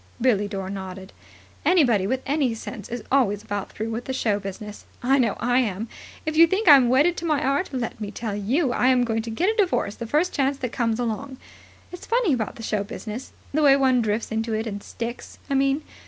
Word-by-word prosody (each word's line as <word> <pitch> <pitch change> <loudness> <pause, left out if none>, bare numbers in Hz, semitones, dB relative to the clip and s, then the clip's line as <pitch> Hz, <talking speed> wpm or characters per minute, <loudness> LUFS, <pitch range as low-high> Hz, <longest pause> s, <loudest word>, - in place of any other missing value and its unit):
Billie 220 -5 +2
Dore 195 -2 -5
nodded. 190 -1 -7 0.5
"Anybody 245 - +3
with 260 +3 -1
any 275 -5 +1
sense 215 -2 -8
is 240 -1 -5
always 210 -7 +2
about 205 -2 -4
through 220 +1 -4
with 230 +2 -4
the 265 - -3
show 215 -5 0
business. 205 +1 -8 0.2
I 270 +3 +3
know 230 -5 +1
I 245 +1 +2
am. 220 -2 -2 0.4
If 310 0 -2
you 335 +1 +8
think 385 +5 -1
I'm 275 -5 +8
wedded 295 +8 +4
to 340 - -4
my 305 -3 +2
art, 280 +6 0
let 245 -4 -4
me 205 - -3
tell 210 0 -4
you 245 - 0
I'm 250 0 +3
going 225 -2 0
to 230 - -7
get 340 - +1
a - - -11
divorce 360 - +1
the 230 - -7
first 305 +9 +1
chance 275 -1 +1
that 250 -4 -4
comes 230 -2 0
along. 245 +3 -3 0.5
It's 360 - -10
funny 460 - +2
about 225 -5 -2
the 230 - -9
show 210 -2 -1
business. 225 +2 -7 0.2
The 310 - +2
way 280 -2 +7
one 260 -3 +3
drifts 215 +1 -1
into 225 +1 -1
it 220 +1 -2
and 205 -2 -5
sticks, 235 +3 -7
I - - +2
mean. 275 +2 +2
240 Hz, 220 wpm, -24 LUFS, 215-275 Hz, 0.5 s, you